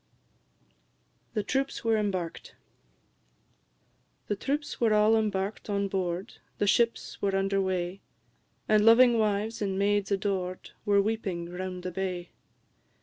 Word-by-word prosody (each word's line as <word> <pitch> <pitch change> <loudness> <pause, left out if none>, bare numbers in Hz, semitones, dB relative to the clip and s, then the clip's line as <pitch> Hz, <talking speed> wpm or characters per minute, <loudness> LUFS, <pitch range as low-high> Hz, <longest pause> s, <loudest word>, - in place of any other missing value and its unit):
THE 210 - 0
TROOPS 270 +5 -1
WERE 225 -1 +2
EMBARKED. 190 -5 -3 1.7
The 205 - +1
troops 285 +7 -3
were 220 -2 +4
all 210 +1 +5
embark'd 210 -1 -1
on 200 -1 0
board, 185 +2 -3 0.2
The - - +1
ships 230 +3 +1
were 195 -1 +1
under 195 0 +1
weigh, 185 0 -2 0.7
And 215 -1 +4
loving 230 +1 +6
wives, 215 +1 0
and 195 -2 -1
maids 205 0 +1
adored, 190 -2 -2
Were 200 -1 +4
weeping 190 -6 -3
round 180 0 -5
the 180 - -3
bay. 180 -1 -4
200 Hz, 125 wpm, -28 LUFS, 185-215 Hz, 1.7 s, loving